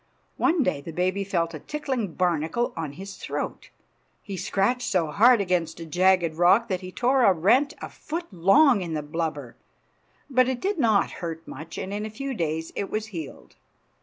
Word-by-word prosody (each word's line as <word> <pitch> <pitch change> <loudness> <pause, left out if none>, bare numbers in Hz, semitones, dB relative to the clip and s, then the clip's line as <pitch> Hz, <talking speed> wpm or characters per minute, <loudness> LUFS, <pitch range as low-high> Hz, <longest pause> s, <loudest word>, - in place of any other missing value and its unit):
One 335 -3 +2
day 140 - -1
the 165 - -8
baby 185 +4 0
felt 170 -4 -1
a 155 - -6
tickling 265 - -3
barnacle 175 +6 0
on 155 -4 -4
his 195 +5 -9
throat. - - -5 0.5
He 200 - -6
scratched 245 +7 0
so 165 -5 +1
hard 235 +6 +6
against 180 -4 -1
a 165 - -6
jagged 180 0 +2
rock 195 +7 +4
that 185 -1 -1
he 185 0 -8
tore 255 +5 +2
a 200 - +7
rent 250 - +3
a - - -3
foot 335 +3 -5
long 205 - +5
in 170 -3 -4
the 150 - -3
blubber. 150 -5 -4 0.7
But 255 -2 +3
it 255 -2 -2
did 390 +2 -1
not 220 -6 +3
hurt 165 -1 -5
much, 155 +4 -9
and 195 - -4
in 205 +1 -3
a 215 - -4
few 270 +5 -5
days 160 -5 -2
it 200 - -3
was 215 +1 -3
healed. 160 -5 -8
190 Hz, 190 wpm, -25 LUFS, 165-240 Hz, 0.7 s, a